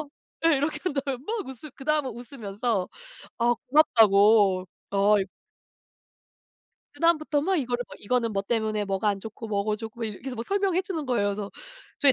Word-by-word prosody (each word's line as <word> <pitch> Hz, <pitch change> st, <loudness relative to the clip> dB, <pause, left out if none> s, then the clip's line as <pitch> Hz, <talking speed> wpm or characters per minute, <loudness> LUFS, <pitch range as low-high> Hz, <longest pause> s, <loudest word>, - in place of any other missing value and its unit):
"엄마!" 300 Hz, -, -7 dB, 0.4 s
예. 315 Hz, -4 st, +5 dB
이렇게 300 Hz, +2 st, -1 dB
한 360 Hz, -, 0 dB
다음에 275 Hz, -2 st, -2 dB
막 435 Hz, -, -3 dB
웃으 265 Hz, +3 st, -9 dB
그 270 Hz, -, -11 dB
다음은 300 Hz, -3 st, +1 dB
웃으면서 230 Hz, -4 st, -3 dB, 0.5 s
아 240 Hz, +1 st, +3 dB
고맙다고. 210 Hz, -8 st, +5 dB, 0.2 s
어이 200 Hz, 0 st, +3 dB, 1.7 s
그다음부터 310 Hz, -2 st, +2 dB
막 375 Hz, +4 st, +1 dB
이거를 245 Hz, -3 st, -1 dB
막 -, -, -10 dB
이거는 230 Hz, +1 st, 0 dB
뭐 195 Hz, -1 st, -1 dB
때문에 215 Hz, -1 st, -1 dB
뭐가 195 Hz, +2 st, 0 dB
안 200 Hz, -1 st, 0 dB
좋고 225 Hz, +1 st, -8 dB
뭐가 210 Hz, 0 st, 0 dB
좋고 225 Hz, +2 st, -9 dB
뭐 230 Hz, -, -1 dB
이렇게 210 Hz, -3 st, -6 dB
계속 250 Hz, -4 st, -4 dB
설명해 390 Hz, +1 st, +1 dB
주는 365 Hz, -6 st, -4 dB
거예요. 220 Hz, -5 st, +1 dB
그래서 200 Hz, 0 st, -4 dB, 0.5 s
저희 280 Hz, -2 st, +6 dB
240 Hz, 360 characters per minute, -26 LUFS, 205-290 Hz, 1.7 s, 저희